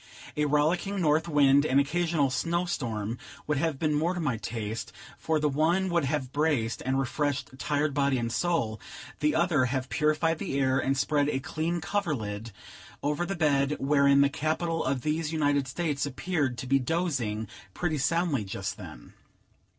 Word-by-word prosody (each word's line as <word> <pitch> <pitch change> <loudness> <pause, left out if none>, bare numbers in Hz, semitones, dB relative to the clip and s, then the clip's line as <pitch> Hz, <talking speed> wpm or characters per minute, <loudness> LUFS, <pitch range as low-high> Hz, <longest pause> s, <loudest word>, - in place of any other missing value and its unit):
A 150 - +1
rollicking 160 +7 +1
north 160 0 +2
wind 145 -3 +5
and 140 -2 +3
occasional 155 -1 +1
snow 170 +5 0
storm 115 - -3 0.3
would 150 -2 0
have 160 -2 0
been 155 +1 0
more 165 +5 +1
to - - -3
my 135 -8 0
taste, 110 0 -4 0.3
for 160 -1 0
the 150 - +2
one 165 +7 +2
would 170 -4 +1
have 135 -2 -2
braced 145 -7 0
and 130 +1 0
refreshed 140 +1 -1
tired 145 +1 0
body 140 -1 +2
and 115 -1 -2
soul, 120 -10 0 0.4
the 150 0 +2
other 160 -5 +3
have 130 +1 -2
purified 155 +5 +1
the 135 - -2
air, 130 -1 +2
and 135 0 0
spread 145 +1 +2
a 135 - 0
clean 160 +5 -2
coverlid 115 - -2 0.5
over 150 +4 0
the 195 - -2
bed, 145 -3 +2
wherein 140 0 +4
the 140 - +4
capital 160 +3 -1
of 130 -1 -1
these 155 +1 -1
United 145 -3 +1
States 145 +1 -2
appeared 145 -2 -1
to - - -5
be 135 +2 +3
dozing 130 - -1 0.3
pretty 160 -4 -1
soundly 155 -2 +1
just 95 - -4
then. - - -11
145 Hz, 170 wpm, -28 LUFS, 135-160 Hz, 0.5 s, wind